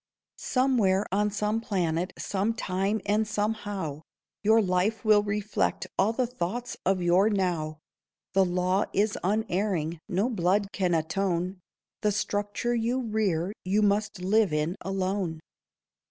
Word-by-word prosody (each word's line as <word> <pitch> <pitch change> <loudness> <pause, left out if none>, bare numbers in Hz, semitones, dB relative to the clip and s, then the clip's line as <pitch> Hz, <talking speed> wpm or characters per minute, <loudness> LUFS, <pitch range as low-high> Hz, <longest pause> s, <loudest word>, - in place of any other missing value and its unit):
Somewhere 230 -7 +2
on 210 +2 +2
some 210 +2 -1
planet, 180 -4 -1
sometime 200 0 -1
and 210 +2 +1
somehow, 205 -7 -2 0.4
Your 220 +2 +5
life 200 +2 +1
will 210 -1 +6
reflect 210 0 -1
all 200 +3 +3
the 250 +2 0
thoughts 240 0 -4
of 190 -2 +2
your 180 +5 +4
now. 175 -6 -1 0.6
The 195 - +5
law 185 +2 +1
is 205 +1 +2
unerring; 185 -5 0
no 195 +4 +1
blood 200 -2 +1
can 180 -3 +1
atone; 180 +3 -1 0.4
The 210 - +2
structure 205 +3 -1
you 240 +2 0
rear 210 -6 0
you 200 +3 +2
must 210 0 +1
live 205 0 +3
in 150 +3 0
alone. 190 -3 -2
200 Hz, 125 wpm, -27 LUFS, 180-215 Hz, 0.6 s, will